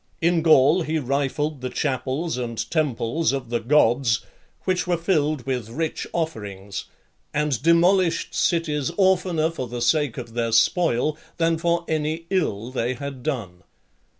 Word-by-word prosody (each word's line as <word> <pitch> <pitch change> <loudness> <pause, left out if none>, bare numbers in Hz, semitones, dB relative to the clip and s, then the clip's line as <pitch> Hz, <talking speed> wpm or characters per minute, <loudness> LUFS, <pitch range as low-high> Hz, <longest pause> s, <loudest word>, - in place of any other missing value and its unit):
In 170 0 +2
Gaul, 155 +1 +5
he 160 0 -1
rifled 140 +1 -1
the 130 - -3
chapels 135 +4 -2
and 120 -2 -3
temples 155 0 0
of 130 -4 -4
the 120 - +1
gods, 120 -2 +2 0.4
which 185 -1 0
were 175 -1 +1
filled 155 -6 0
with 125 -5 -2
rich 160 +6 -3
offerings, 105 - -4 0.5
and 150 -5 0
demolished 170 +2 +3
cities 155 -5 0
oftener 180 -4 +2
for 130 -6 -5
the 120 +1 -5
sake 140 +1 +1
of 120 -3 -7
their 115 -1 -1
spoil, 155 +3 +2 0.2
than 165 -1 +1
for 170 0 0
any 155 +1 -2
ill 125 - -1
they 130 0 -1
had 140 0 -6
done. 115 - -4
150 Hz, 145 wpm, -23 LUFS, 120-165 Hz, 0.5 s, Gaul